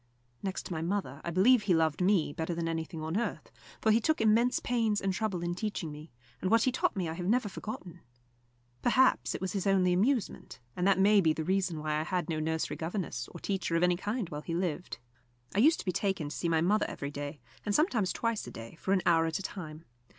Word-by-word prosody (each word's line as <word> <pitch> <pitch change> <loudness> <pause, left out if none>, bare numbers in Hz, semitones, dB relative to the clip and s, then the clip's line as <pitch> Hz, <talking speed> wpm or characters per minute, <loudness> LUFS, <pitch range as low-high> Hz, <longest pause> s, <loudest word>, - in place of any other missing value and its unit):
Next 190 -1 -4
to - - -5
my 160 - -3
mother, 170 -5 -2
I - - -3
believe 210 +8 +5
he 190 -4 +2
loved 160 0 +1
me 180 -6 +2
better 160 +2 -3
than 165 0 -2
anything 160 -1 -4
on 160 +2 -3
earth, 235 - -3 0.3
for 220 - +3
he 220 - +5
took 315 +6 +1
immense 230 +3 +3
pains 225 -4 +1
and 195 -1 -1
trouble 195 -4 -2
in 175 0 -1
teaching 185 -4 -3
me, 150 +2 -10 0.3
and 185 - 0
what 230 +2 +4
he 255 - +2
taught 260 - 0
me 185 -4 -1
I 160 - -3
have 175 +1 -4
never 230 +1 +2
forgotten. 195 -4 -7 0.8
Perhaps 255 +2 +3
it - - -5
was 190 -1 -2
his 200 -1 -1
only 185 -2 +3
amusement, 225 - 0 0.2
and 180 +1 +1
that 195 - +4
may 200 +1 +5
be 160 -3 +3
the 160 - -3
reason 185 -1 0
why 150 0 -1
I - - -1
had 180 +1 -2
no 155 - -1
nursery 160 +1 -2
governess 160 - -3
or 170 - -9
teacher 190 -3 -2
of 165 - +2
any 180 0 +4
kind 210 +3 -3
while 150 0 -5
he 165 +2 -4
lived. 180 0 -2 0.6
I 195 - +1
used 310 +8 +6
to - - -14
be 185 - +1
taken 190 -5 -1
to 145 - -6
see 170 - -1
my 160 -1 +2
mother 205 +5 +2
every 140 0 -5
day, 145 +1 -6 0.2
and 205 - -1
sometimes 230 - +2
twice 230 -2 -2
a - - -7
day, 115 +7 -10
for 190 - +1
an 185 - +2
hour 165 -1 +4
at 160 - -1
a 195 - -6
time. 160 -5 -7
180 Hz, 240 wpm, -30 LUFS, 160-210 Hz, 0.8 s, used